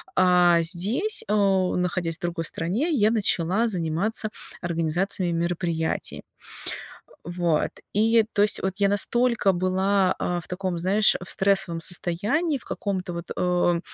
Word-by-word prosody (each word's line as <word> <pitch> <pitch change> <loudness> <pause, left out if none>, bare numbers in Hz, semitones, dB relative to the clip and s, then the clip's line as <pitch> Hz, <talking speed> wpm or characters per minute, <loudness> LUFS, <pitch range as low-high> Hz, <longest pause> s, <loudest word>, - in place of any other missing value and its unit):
а 180 -2 +4
здесь, 205 - +4
э 205 - -1
находясь 185 -4 0
в - - -41
другой 170 -1 -3
стране, 200 - -2
я 220 -8 +2
начала 205 0 0
заниматься 190 +4 -1 0.3
организациями 175 +2 -2
мероприятий. 170 -1 -3 1.0
Вот, 175 -3 -1 0.2
и 225 +2 +3
то 205 - +1
есть, 210 - +4
вот, 190 -1 -2
я 200 -1 +1
настолько 230 +1 +2
была, 185 +1 0
а, 175 -1 -2
в - - -13
таком, 180 -1 -4
знаешь, 200 +5 +3
в 175 - -4
стрессовом 190 -4 +2
состоянии, 210 - +1
в - - -18
каком-то, 185 -3 -4
вот, 170 0 -8
э, 175 -1 0
185 Hz, 135 wpm, -24 LUFS, 175-205 Hz, 1.0 s, а